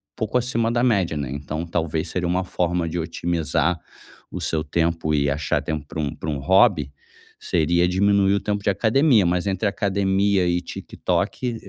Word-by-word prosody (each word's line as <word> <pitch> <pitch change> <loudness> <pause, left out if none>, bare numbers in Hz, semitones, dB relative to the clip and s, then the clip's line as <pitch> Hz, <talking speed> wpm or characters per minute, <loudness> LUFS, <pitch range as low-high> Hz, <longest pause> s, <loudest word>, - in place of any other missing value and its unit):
pouco 110 +1 -1
acima 115 -2 0
da 120 - +1
média, 100 -10 +2
né, 70 -3 -3
então 75 +3 -4
talvez, 80 -2 -2
seria 90 -1 -2
uma 90 +2 0
forma 90 -2 -1
de 85 - -4
otimizar 85 +1 -1 0.5
o - - -5
seu 80 -1 -1
tempo 80 0 0
e 70 -1 +2
achar 70 0 -1
tempo 75 -2 -4
para 80 - -6
um 70 -3 -2
para 80 - -5
um 75 -2 -2
hobby, 95 - +3 0.5
seria 85 +1 +1
diminuir 100 +1 +3
o - - +1
tempo 100 -1 -3
de - - +1
academia, 110 - +3
mas 90 +1 0
entre 95 +2 0
academia 100 -2 +1
e 90 0 +1
TikTok, 115 +6 -3
90 Hz, 175 wpm, -22 LUFS, 80-100 Hz, 0.5 s, hobby